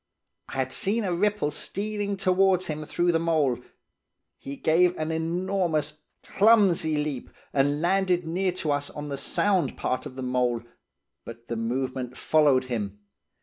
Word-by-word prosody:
I - - -9
had 130 -1 -2
seen 215 +4 0
a 185 -3 -1
ripple 205 -3 +1
stealing 205 +4 -3
towards 185 0 +3
him 155 0 -4
through 175 +3 +1
the 165 - +2
mould. 150 -7 +1 0.8
He 140 - -7
gave 175 +5 +3
an 155 +1 -2
enormous, 165 -2 -1 0.2
clumsy 195 -8 +4
leap, 150 -3 -3 0.2
and 145 +1 +2
landed 180 -1 +2
near 180 +3 0
to 160 -4 -2
us 145 0 -1
on 150 0 -7
the 140 - -2
sound 190 +5 +1
part 130 +3 -2
of 130 - -12
the 130 - -5
mould, 125 -2 0 0.6
but 115 0 -11
the 115 - -2
movement 125 +2 -3
followed 145 -4 +3
him. 105 -5 -4
155 Hz, 150 wpm, -26 LUFS, 130-185 Hz, 0.8 s, clumsy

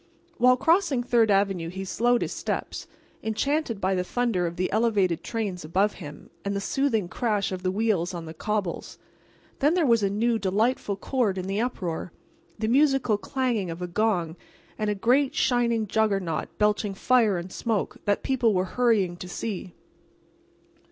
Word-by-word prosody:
While 250 +1 +5
crossing 325 -4 +2
Third 235 -2 +3
avenue 195 -4 +1
he 190 +2 -6
slowed 240 +5 +1
his - - -4
steps, - - -4 0.3
enchanted 230 +2 -1
by 190 0 +1
the 180 -1 0
thunder 210 -4 0
of 170 - -5
the 185 +1 -1
elevated 205 -6 +1
trains 205 -6 -3
above 195 +6 +1
him 145 -2 -10
and 200 0 -2
the - - 0
soothing 225 -2 0
crash 210 0 -1
of 185 -1 -4
the 185 - 0
wheels 195 -3 0
on 170 -2 -6
the 160 - -8
cobbles. 205 0 -3 0.6
And - - -34
then 295 +3 +3
there 350 -3 +2
was 230 -4 +4
a 200 - +2
new, 225 +3 +1
delightful 205 +2 0
chord 215 -2 -1
in 185 - -3
the 195 +3 -1
uproar—the 190 0 -5
musical 270 -4 +3
clanging 235 -3 -1
of 165 +1 -6
a - - -2
gong 175 -4 0 0.4
and 215 -1 -2
a 210 - 0
great 255 +7 +2
shining 235 -3 +2
juggernaut 195 -6 0
belching 210 -1 +1
fire 225 -3 +3
and 175 +2 -6
smoke, 225 -1 -2
that 205 0 +1
people 240 -6 +2
were 185 0 +1
hurrying 215 -8 +2
to 180 - -8
see. 185 -2 -5
210 Hz, 170 wpm, -26 LUFS, 185-240 Hz, 0.6 s, While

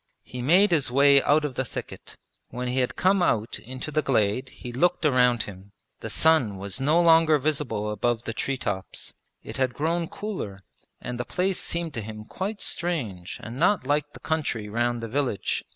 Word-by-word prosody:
He 125 - -7
made 180 +10 +5
his 150 -7 +2
way 140 +2 +6
out 150 +1 +3
of 145 - -3
the 130 - -1
thicket. - - -8 0.3
When 125 +1 -4
he 125 +1 0
had 125 - 0
come 190 +1 +3
out 115 -10 0
into 130 +5 -7
the 155 +1 +1
glade 125 -1 +1
he 125 -2 -9
looked 175 +6 +1
around 125 -5 +4
him; 100 0 -11 0.3
the - - -6
sun 150 -11 +3
was 100 +6 -3
no 150 +5 +3
longer 165 -2 +6
visible 140 -7 -1
above 115 +3 0
the 115 - -4
tree 135 +3 -2
tops. 100 -6 -4 0.3
It - - -7
had 130 -2 0
grown 165 +2 0
cooler 105 - -6 0.4
and 125 0 -5
the - - 0
place 185 +7 -1
seemed 170 -2 -3
to 115 - -3
him 110 0 -8
quite 200 - -4
strange 115 - -2
and 120 +4 -7
not 180 -3 +3
like 145 +1 0
the - - -11
country 145 -9 -2
round 120 +2 -1
the - - -3
village. 125 -5 -1
130 Hz, 190 wpm, -26 LUFS, 115-160 Hz, 0.4 s, way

